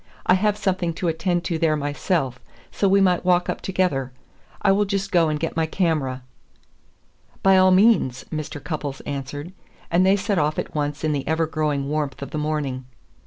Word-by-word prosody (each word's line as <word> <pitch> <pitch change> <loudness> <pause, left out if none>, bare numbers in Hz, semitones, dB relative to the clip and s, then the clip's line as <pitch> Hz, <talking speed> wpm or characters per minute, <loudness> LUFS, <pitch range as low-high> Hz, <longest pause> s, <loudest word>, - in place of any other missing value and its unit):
I - - +5
have 210 +2 +2
something 185 -4 -1
to 175 - -1
attend 175 +2 -1
to 170 -2 -2
there 155 -1 +2
myself, 145 -2 -1 0.3
so 200 - +1
we 200 +1 +5
might 180 -2 +3
walk 180 -1 +2
up - - -7
together. 180 -9 -1 0.5
I 200 - +5
will 205 +1 +3
just 195 0 -2
go 170 -4 +3
and 150 -1 -1
get 165 - -3
my 160 -1 +1
camera." 150 -8 -1 1.2
"By 195 0 +6
all 185 0 +6
means," 185 - +3
Mr. 155 -1 -4
Cupples 145 -4 -4
answered; 145 +4 -6 0.4
and 175 +2 +4
they 190 +1 +5
set 200 -1 0
off 150 +1 0
at - - -4
once 145 0 -2
in 155 - +1
the 140 -2 -3
ever 160 +1 +1
growing 150 -3 -1
warmth 145 -2 -2
of - - -8
the 155 - -3
morning. 145 -4 -2
160 Hz, 190 wpm, -23 LUFS, 145-185 Hz, 1.2 s, By